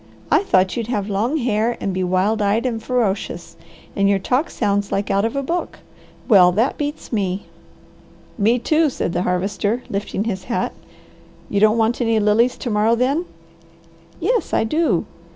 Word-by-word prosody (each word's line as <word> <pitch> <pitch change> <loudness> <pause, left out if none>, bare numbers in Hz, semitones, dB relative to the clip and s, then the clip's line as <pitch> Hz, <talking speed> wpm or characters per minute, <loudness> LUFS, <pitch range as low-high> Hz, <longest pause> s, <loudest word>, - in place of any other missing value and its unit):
I - - +5
thought 185 - +2
you'd 230 -3 -3
have 210 -4 -2
long 230 +10 0
hair, 235 -3 0
and 195 - -2
be 185 0 -1
wild 185 +4 +1
eyed 210 +4 +1
and 230 -3 -2
ferocious. 210 -8 -2 0.4
And 200 0 +2
your 200 - +3
talk 255 - 0
sounds 205 -2 -1
like 200 - -1
out 200 +2 +2
of 230 - -2
a 275 - -1
book. 340 +6 -3 0.5
Well 185 -6 +6
that 230 +8 +1
beats 295 -3 -4
me!" 195 -2 -1 0.9
"Me 225 +3 +2
too!" 310 +5 +2
said 175 - -3
the 175 - 0
Harvester, 200 +6 -1
lifting 200 0 -2
his 190 -4 -4
hat. 235 - -2 0.8
"You 200 - +1
don't 215 +2 +4
want 230 +2 +1
any 225 -2 +2
lilies 220 +4 +2
to 245 - -4
morrow, 215 +2 +3
then?" 275 +8 0 0.9
"Yes 465 +8 0
I - - +2
do. 230 - +1
220 Hz, 170 wpm, -20 LUFS, 200-250 Hz, 0.9 s, Well